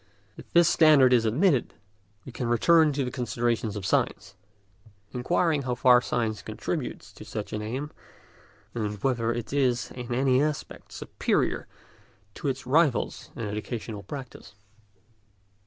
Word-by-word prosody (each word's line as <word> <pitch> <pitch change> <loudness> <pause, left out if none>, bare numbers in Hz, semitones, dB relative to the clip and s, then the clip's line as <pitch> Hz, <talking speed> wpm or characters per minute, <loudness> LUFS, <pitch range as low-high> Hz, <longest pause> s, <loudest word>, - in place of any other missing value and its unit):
If - - -13
this 170 -1 +5
standard 145 -5 +6
is 115 -2 +4
admitted, 135 - +2 0.5
we 130 - -8
can 120 0 -4
return 155 +6 +4
to 135 -1 -1
the 125 - -4
consideration 120 -2 -1
of 100 - -5
science, - - 0 0.8
inquiring 155 +4 +1
how 125 -2 -2
far 125 0 +5
science 115 -3 -2
contributes - - -5
to - - -11
such 105 -2 -6
an 105 - -2
aim, 130 +8 -4 0.8
and 105 -3 -3
whether 115 -4 +1
it 120 0 -5
is 130 -4 +1
in 125 -1 -7
any 130 +1 +3
respect 150 0 -4
superior - - -1 0.7
to 145 - -5
its 135 -1 -3
rivals 145 0 +1
in 115 - -5
educational 105 0 -5
practice. 125 0 -9
125 Hz, 140 wpm, -27 LUFS, 115-140 Hz, 0.8 s, standard